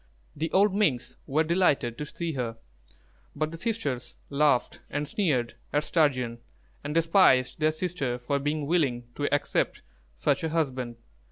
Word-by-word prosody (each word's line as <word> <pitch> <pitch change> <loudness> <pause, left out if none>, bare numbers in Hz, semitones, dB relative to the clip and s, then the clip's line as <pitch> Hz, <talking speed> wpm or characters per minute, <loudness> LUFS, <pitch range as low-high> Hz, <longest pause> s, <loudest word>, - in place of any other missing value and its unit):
The 160 +2 -2
old 200 +1 +4
Minks 130 - 0
were 155 +4 +2
delighted 155 -8 +2
to 150 - -4
see 170 +2 -4
her; 120 -4 -3 0.8
but 155 +1 -1
the 165 - -6
sisters 165 - -3 0.2
laughed 140 -3 +2
and 145 +1 -2
sneered 145 - 0 0.2
at 145 +1 +1
Sturgeon, 130 -7 +1 0.4
and 150 +2 -4
despised 165 -7 +4
their 155 0 +3
sister 155 -7 -2
for 130 +3 -1
being 145 +1 -1
willing 140 -7 +1
to 145 +2 -2
accept 145 - 0 0.3
such - - +1
a 160 - 0
husband. 130 -7 -1
145 Hz, 150 wpm, -27 LUFS, 130-165 Hz, 0.8 s, old